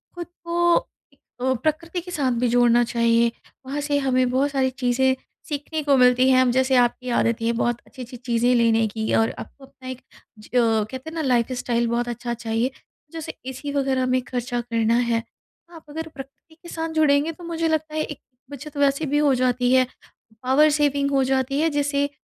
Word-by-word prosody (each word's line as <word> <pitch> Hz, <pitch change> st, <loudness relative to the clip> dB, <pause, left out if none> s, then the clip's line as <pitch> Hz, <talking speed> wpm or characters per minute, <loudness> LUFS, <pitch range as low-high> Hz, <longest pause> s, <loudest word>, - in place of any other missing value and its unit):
ख़ुद 345 Hz, -2 st, -6 dB, 0.2 s
को 345 Hz, 0 st, +2 dB
अ, 260 Hz, +1 st, -5 dB
प्रकृति 335 Hz, +3 st, -1 dB
के 360 Hz, +1 st, -10 dB
साथ 280 Hz, -6 st, 0 dB
भी 250 Hz, -, +3 dB
जोड़ना 240 Hz, 0 st, +4 dB
चाहिए, 235 Hz, 0 st, +2 dB, 0.3 s
वहाँ 280 Hz, +3 st, -3 dB
से 290 Hz, 0 st, 0 dB
हमें 255 Hz, -2 st, +1 dB
बहुत 275 Hz, +3 st, +1 dB
सारी 265 Hz, -2 st, +1 dB
चीज़ें, 260 Hz, 0 st, +1 dB, 0.3 s
सीखने 300 Hz, +2 st, -3 dB
को 285 Hz, -1 st, +3 dB
मिलती 250 Hz, 0 st, +5 dB
हैं। 255 Hz, -1 st, +4 dB
जैसे 260 Hz, +1 st, +2 dB
अब 245 Hz, -, +6 dB
आपकी 250 Hz, +1 st, -2 dB
आदत 230 Hz, 0 st, +1 dB
है 230 Hz, +1 st, +1 dB
बहुत 240 Hz, 0 st, 0 dB
अच्छी-अच्छी 250 Hz, -2 st, -10 dB
चीज़ें 240 Hz, 0 st, +1 dB
लेने 225 Hz, -1 st, +3 dB
की 220 Hz, +1 st, -3 dB
और 225 Hz, 0 st, +3 dB
आपको 280 Hz, -, -11 dB
अपना 260 Hz, -1 st, -12 dB
एक 255 Hz, -1 st, -6 dB, 0.4 s
ज 215 Hz, -, -14 dB
कहते 230 Hz, +3 st, +1 dB
हैं -, -, -11 dB
ना 325 Hz, -, -1 dB
लाइफ 250 Hz, -4 st, +1 dB
स्टाइल 235 Hz, -1 st, 0 dB
बहुत 240 Hz, +1 st, -1 dB
अच्छा 240 Hz, 0 st, -4 dB
चाहिए, 230 Hz, +2 st, -1 dB, 0.4 s
जैसे 325 Hz, -2 st, -6 dB, 0.2 s
ऐसी 265 Hz, +2 st, -6 dB
वग़ैरह 270 Hz, -2 st, +1 dB
में 255 Hz, 0 st, +1 dB
ख़र्चा 245 Hz, -1 st, -2 dB
करना 230 Hz, -1 st, 0 dB, 0.2 s
है। 230 Hz, 0 st, 0 dB, 0.5 s
आप 325 Hz, -, -12 dB
अगर 320 Hz, +2 st, -5 dB
प्रकृति 280 Hz, +2 st, -13 dB
के 345 Hz, -, -10 dB
साथ 325 Hz, -1 st, -4 dB
जुड़ेंगे, 305 Hz, 0 st, +3 dB
तो 340 Hz, +2 st, -14 dB
मुझे 330 Hz, -1 st, -2 dB
लगता 315 Hz, -1 st, -1 dB
है 310 Hz, -, 0 dB
एक 295 Hz, -, -7 dB, 0.3 s
बचत 285 Hz, +1 st, -9 dB
वैसे 280 Hz, +2 st, +2 dB
भी 290 Hz, +1 st, 0 dB
हो 295 Hz, -2 st, +3 dB
जाती 250 Hz, 0 st, +1 dB
है 255 Hz, -1 st, +4 dB, 0.6 s
पावर 275 Hz, +4 st, +4 dB
सेविंग 285 Hz, -1 st, +1 dB
हो 270 Hz, -1 st, +3 dB
जाती 265 Hz, +1 st, 0 dB
है, 325 Hz, -, +3 dB
जैसे 285 Hz, -1 st, 0 dB
260 Hz, 195 wpm, -23 LUFS, 240-290 Hz, 0.6 s, अब